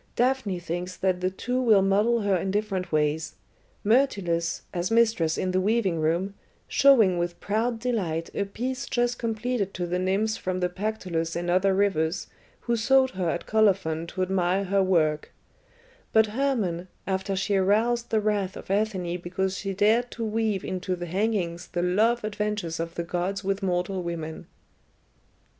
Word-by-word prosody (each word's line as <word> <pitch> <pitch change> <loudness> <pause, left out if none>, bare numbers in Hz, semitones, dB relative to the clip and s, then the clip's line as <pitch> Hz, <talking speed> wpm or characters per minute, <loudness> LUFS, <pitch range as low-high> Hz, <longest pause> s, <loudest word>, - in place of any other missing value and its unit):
"Daphne 245 -6 +1
thinks 175 +1 -5
that 185 -1 0
the 185 - +1
two 250 +7 -2
will 215 -6 +5
model 210 +4 +2
her 200 -2 +2
in 185 +2 -1
different 195 -2 -2
ways: 155 +1 0 0.5
Myrtilus, 200 -8 +1
as 175 0 -1
mistress 225 -8 +2
in 185 - -1
the 185 0 +1
weaving 200 -4 +1
room, 170 +5 0 0.3
showing 225 -11 +5
with 175 0 -3
proud 225 +3 0
delight 195 -9 -2
a 200 - -1
piece 255 +6 -4
just 240 0 0
completed 225 -2 -2
to 175 - -2
the 180 +1 -1
nymphs 200 +4 0
from 185 0 -3
the 180 -1 0
Pactolus 180 -4 -3
and 175 +1 -1
other 190 +2 +3
rivers, 180 -3 +1 0.4
who 235 - 0
sought 260 +3 +3
her 185 -3 -1
at 175 - -3
Colophon 190 -7 +2
to 185 +2 -2
admire 185 0 +1
her 195 +1 +1
work; 160 -5 +1 0.8
but 220 0 +5
Hermon, 215 -7 -1 0.2
after 190 +1 -1
she 200 +2 0
aroused 225 +5 +2
the 220 - +2
wrath 205 -3 -1
of - - -8
Athene 190 -4 0
because 190 +2 -2
she 195 +1 -3
dared 220 +5 +3
to 230 - -3
weave 215 -3 0
into 185 0 -2
the 175 0 -5
hangings 180 -2 -1
the 175 -1 0
love 220 +6 +2
adventures 210 -5 -2
of 165 0 -4
the 170 - -2
gods 180 +3 -2
with 195 +1 -1
mortal 185 0 -1
women." 165 -2 -5
195 Hz, 165 wpm, -26 LUFS, 175-220 Hz, 0.8 s, will